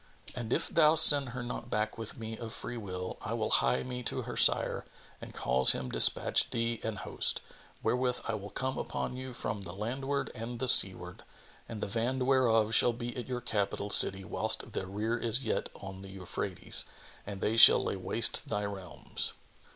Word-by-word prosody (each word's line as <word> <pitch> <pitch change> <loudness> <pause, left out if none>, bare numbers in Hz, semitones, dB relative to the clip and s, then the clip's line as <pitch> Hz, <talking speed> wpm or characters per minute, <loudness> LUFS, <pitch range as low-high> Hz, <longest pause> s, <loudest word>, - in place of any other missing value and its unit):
And 120 -2 -7
if 165 - 0
thou 155 -1 +3
send 145 -4 +10
her 125 0 -7
not 120 -1 -8
back 105 -1 -3
with 115 -1 -8
me 110 0 -8
of 110 -1 -8
free 120 - -6
will, 90 -5 -8
I - - -6
will - - -4
hie 65 - +1
me 125 -1 -7
to - - -4
her - - -8
sire - - +2 0.4
and - - -11
cause 65 +1 +2
him 65 -1 -7
despatch - - +2
thee 115 -1 -4
an 110 -1 -5
host, - - -2 0.4
wherewith 125 0 -2
I 115 - -3
will 100 -1 -7
come 130 +3 -5
upon - - -6
you 130 0 -8
from 105 -4 -6
the 85 -2 -9
landward 135 +7 -5
and 120 0 -8
the 130 - -3
seaward; 90 -6 +5 0.5
and 110 -2 -8
the - - -3
van 115 +5 -3
whereof 115 -5 +1
shall 120 +1 +3
be 120 0 -8
at 125 - -7
your 125 -1 -5
capital 105 -3 -4
city 95 0 +5
whilst - - -2
the 95 - -5
rear 110 +4 -4
is 120 +3 -1
yet - - -3
on 95 -1 -11
the 95 - -12
Euphrates[FN#25] 95 0 -5 0.4
and 100 -1 -8
they 110 - -1
shall 115 - +9
lay - - -4
waste - - +1
thy 105 0 -3
realms." 95 -3 -6
115 Hz, 190 wpm, -29 LUFS, 100-125 Hz, 0.5 s, send